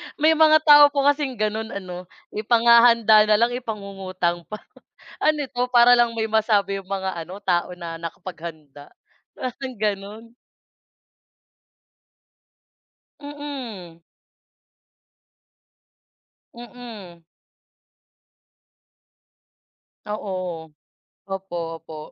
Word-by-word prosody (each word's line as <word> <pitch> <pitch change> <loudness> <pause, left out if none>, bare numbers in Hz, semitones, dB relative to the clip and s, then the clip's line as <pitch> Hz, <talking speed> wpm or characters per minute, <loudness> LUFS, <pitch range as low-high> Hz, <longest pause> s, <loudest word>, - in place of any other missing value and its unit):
May 310 +1 +3
mga 310 -1 +5
tao 290 -1 +8
po 280 -1 -1
kasing 285 -2 +1
gano'n 215 +1 -2 0.2
ano, 180 -1 -9 0.2
ipanghahanda 230 -1 +5
na 210 - +4
lang 235 +3 +2
ipangungutang 195 -7 -4
pa. 215 - -6 0.7
Ano 300 -1 +1
'to, 250 -1 -3
para 245 0 +6
lang 240 -1 +3
may 220 - -1
masabi 210 -3 +1
yung 190 - -19
mga 190 -1 -3
ano 175 +4 -8
tao 180 0 -1
na 165 -2 -7
nakapaghanda, 160 -4 -9 0.5
parang 255 0 -6
gano'n? 205 +1 -3 3.0
Mm. 260 - -8 2.5
Mm. 230 -8 -11 2.8
Oo. 185 -6 -5 0.6
Opo, 175 -4 -5
opo, 160 - -11
215 Hz, 85 wpm, -22 LUFS, 180-245 Hz, 3.0 s, tao